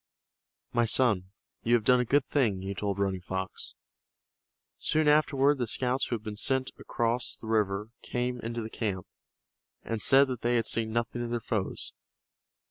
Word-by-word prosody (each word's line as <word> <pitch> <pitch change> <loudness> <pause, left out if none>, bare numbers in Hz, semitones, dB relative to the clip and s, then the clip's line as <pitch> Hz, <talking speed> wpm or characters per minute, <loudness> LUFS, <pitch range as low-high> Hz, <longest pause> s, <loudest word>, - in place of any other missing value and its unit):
"My 120 0 +3
son, 105 -6 +2 0.3
you 120 +1 +3
have 115 - +1
done 125 +2 +5
a 125 - +1
good 140 +3 +2
thing," 110 -10 +1
he 100 +1 -3
told 100 0 -2
Running 95 -2 -1
Fox. 95 +1 -5 1.0
Soon 155 0 +1
afterward 145 -2 +4
the 120 - -1
scouts 130 +3 0
who 120 - -1
had 110 - -7
been 105 -1 -5
sent 130 +4 +1
across 120 +1 -1
the - - -9
river 105 -1 0
came 125 0 -2
into 115 0 -4
the 110 - -6
camp, 95 -5 -3 0.8
and 115 -2 -2
said 135 +4 +6
that 125 -3 -4
they 120 +1 +1
had 115 - +2
seen 110 -1 0
nothing 115 +1 -2
of 120 - -3
their 120 0 -1
foes. 105 -3 -3
115 Hz, 175 wpm, -29 LUFS, 105-125 Hz, 1.0 s, said